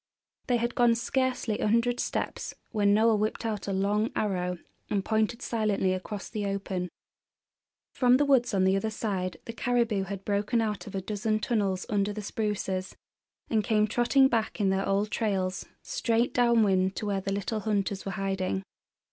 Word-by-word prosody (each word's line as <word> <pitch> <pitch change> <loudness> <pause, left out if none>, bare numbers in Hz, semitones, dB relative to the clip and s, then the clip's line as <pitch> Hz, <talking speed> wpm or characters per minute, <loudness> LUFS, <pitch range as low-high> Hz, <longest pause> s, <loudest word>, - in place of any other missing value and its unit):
They 245 -2 +3
had 235 +1 -1
gone 240 -2 +4
scarcely 255 -2 -1
a - - +1
hundred 235 +3 +2
steps - - -3 0.2
when 205 -2 +3
Noel 220 +1 +4
whipped 215 +2 -1
out 210 -3 -3
a - - -1
long 205 +3 +1
arrow 180 -4 -1 0.3
and 200 -2 0
pointed 220 +2 0
silently 210 -5 +1
across 195 +2 -5
the 215 -2 -4
open. 195 -2 -3 1.0
From 250 -1 +4
the 290 - +2
woods 260 -4 +3
on 190 - +3
the 190 +1 +4
other 220 +3 0
side 195 -4 -3
the 230 - -6
caribou 230 -4 +1
had 195 0 -6
broken 205 +3 +1
out 210 -2 -2
of 200 - -7
a 190 - -1
dozen 215 +2 -1
tunnels 200 -5 0
under 205 -1 0
the 210 0 -5
spruces, 195 -3 -2 0.5
and 220 -2 +1
came 215 -1 +3
trotting 240 +5 +4
back 230 -3 -1
in 195 -2 +2
their 190 0 0
old 200 +2 +1
trails, 190 -4 -1 0.2
straight 235 - 0
downwind 210 -6 +3
to - - -4
where 200 -2 -1
the 195 - -3
little 200 +2 -2
hunters 200 -2 -1
were 195 - -4
hiding. 195 0 -2
210 Hz, 175 wpm, -28 LUFS, 195-230 Hz, 1.0 s, gone